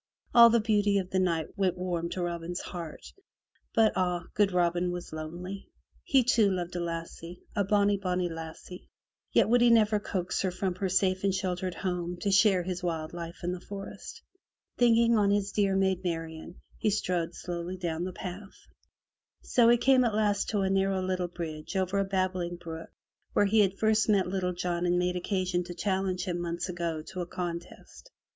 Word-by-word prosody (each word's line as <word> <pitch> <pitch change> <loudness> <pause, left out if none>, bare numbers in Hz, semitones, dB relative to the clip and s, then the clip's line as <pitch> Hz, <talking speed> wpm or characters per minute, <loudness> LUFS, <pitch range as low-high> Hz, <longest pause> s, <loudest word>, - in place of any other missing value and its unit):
All 235 -1 +9
the 235 0 +4
beauty 205 -2 +2
of 190 -1 -2
the 185 - +2
night 165 -4 -1
went 190 -3 0
warm 175 -2 -2
to 180 - -3
Robin's 175 +1 -3
heart, 170 -4 -8 0.6
but 220 -1 +4
ah! 180 -1 0
good 205 -2 +3
Robin 175 0 +1
was 175 -2 -6
lonely. 175 +5 -6 0.4
He, 270 -3 +4
too, 230 -4 +4
loved 180 -2 -3
a - - -1
lassie, 170 0 -6
a 205 - +2
bonny, 205 0 +3
bonny 180 -2 -1
lassie, 165 +2 -9 0.4
yet - - +4
would 240 +2 +4
he 240 - +6
never 215 -2 +4
coax 185 -3 -2
her 190 - +1
from 185 +1 -2
her 190 +1 -2
safe 185 0 +1
and 195 -1 +2
sheltered 185 -1 -2
home 180 -1 -3
to 200 - 0
share 195 -2 +4
his 180 0 -4
wild 165 -3 -3
life 170 +1 -7
in 175 - -1
the 180 - -4
forest. 200 -1 -9 0.5
Thinking 235 -1 +4
on 200 -1 +3
his 200 0 +1
dear 200 -2 +1
Maid 190 -1 +1
Marian, 165 -1 -4 0.2
he 215 - +2
strode 180 -4 -1
slowly 175 +1 -5
down 170 -2 -2
the 185 - -3
path. 190 +2 -8 0.9
So 235 -2 +4
he 240 - +6
came 260 +1 +4
at 230 -3 0
last 205 -2 +1
to 205 -2 0
a 190 - +1
narrow 195 -1 +1
little 185 -1 -1
bridge 165 -1 -6
over 190 +1 +1
a 195 - +1
babbling 185 -2 -1
brook 165 -1 -8 0.4
where 205 - +4
he 215 +2 +3
had 195 -2 +3
first 220 0 +2
met 200 -3 +4
Little 180 -1 -1
John 175 0 -1
and 175 0 +2
made 180 0 0
occasion 180 -1 -1
to 175 0 -7
challenge 190 0 -1
him 175 -2 -2
months 170 +1 -3
agone 170 -3 -3
to 185 - -5
a 175 - -4
contest. 175 - -7
185 Hz, 190 wpm, -29 LUFS, 175-200 Hz, 0.9 s, All